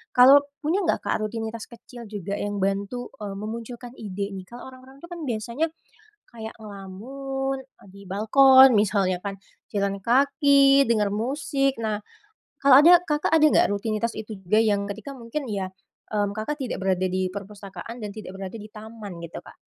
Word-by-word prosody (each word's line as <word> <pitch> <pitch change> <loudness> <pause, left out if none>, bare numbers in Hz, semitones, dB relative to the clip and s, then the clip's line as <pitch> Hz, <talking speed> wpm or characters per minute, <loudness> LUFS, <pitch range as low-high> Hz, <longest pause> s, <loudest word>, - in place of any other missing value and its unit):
Kalau 265 +3 +8 0.2
punya 330 +7 +1
enggak 335 - +1
Kak, - - 0
rutinitas 225 +1 -4
kecil 235 0 -12
juga 200 -2 -5
yang 205 0 -3
bantu, 200 +5 -2
eee, 200 -1 -5
memunculkan 235 +3 -7
ide 200 -2 -5
nih? 190 - -7
Kalau 240 +2 -10
orang-orang 260 +1 -15
tuh - - -8
kan 345 - -7
biasanya, 240 +4 -2 0.6
kayak 220 -1 -8
ngelamun, 265 +7 -5
eee, 260 - -22
di 200 - -13
balkon 260 +7 +7
misalnya 195 -3 +2
kan, 200 - -2 0.4
jalan 200 -1 0
kaki, 275 +2 +5
dengar 210 -3 +2
musik 275 +5 -1
nah, 215 -1 -1 0.6
kalau 275 -1 +8
ada, 350 0 +8
Kakak 300 -2 -1
ada 320 -1 +5
enggak - - +4
rutinitas 215 +2 -2
itu 215 -1 -7
juga 190 +4 +2
yang 205 -2 +1
ketika 215 +7 -7
mungkin 240 +2 -5
ya, 195 -2 -2 0.5
mmm, 205 -1 +1
Kakak 295 +8 -3
tidak 255 - -3
berada 185 -1 +1
di 185 0 0
perpustakaan 200 +3 -8
dan 210 -2 -5
tidak 190 -3 -8
berada 195 +2 -7
di 215 -1 -9
taman 215 -3 -9
gitu, 165 - -9
Kak? - - -15
220 Hz, 170 wpm, -25 LUFS, 200-265 Hz, 0.6 s, Kalau